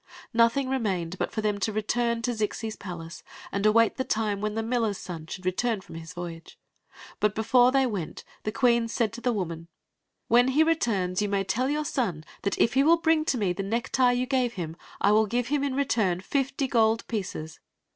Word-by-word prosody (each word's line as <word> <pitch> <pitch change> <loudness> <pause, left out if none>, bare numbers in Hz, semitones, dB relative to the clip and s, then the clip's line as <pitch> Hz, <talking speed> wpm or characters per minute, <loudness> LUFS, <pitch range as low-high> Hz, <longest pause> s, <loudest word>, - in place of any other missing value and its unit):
Nothing 235 +4 +3
remained 190 -9 -2
but - - -1
for 220 - -2
them 210 -1 0
to 220 - 0
return 230 +2 0
to 245 - +1
Zixis 220 0 -3
palace 170 -3 -8 0.3
and 200 +1 +1
await 230 +1 +4
the 260 - 0
time 210 -4 -1
when 215 0 -2
the 225 - -1
miller's 225 -3 0
son 165 -3 -7
should 185 +2 -8
return 215 +4 0
from 190 - -13
his 165 +1 -8
voyage. 175 -2 -8 0.6
But 210 -1 +1
before 245 +3 +4
they 270 0 +3
went 200 -10 -4 0.2
the 215 - -3
queen 235 -1 +3
said 230 -1 -1
to 240 - -8
the 245 - +1
woman: 170 -6 -4 0.6
"When 245 +2 +5
he 280 +4 +4
returns 210 - +1
you 205 - 0
may 200 -1 +1
tell 240 +8 0
your 300 +1 -1
son 205 - -1 0.2
that 200 - -1
if - - +3
he 265 - +4
will 325 +4 +5
bring 320 -1 +2
to 270 - +1
me 195 -5 +1
the 195 - -4
necktie 245 +5 +1
you 250 +1 0
gave 255 -2 0
him, 165 -5 -5 0.2
I 200 - +4
will 215 +1 +4
give 245 +3 -1
him 290 -1 +1
in 275 -2 -1
return 220 -10 +1
fifty 270 +5 -1
gold 225 -2 +2
pieces." 180 -8 -5
225 Hz, 205 wpm, -27 LUFS, 195-250 Hz, 0.6 s, When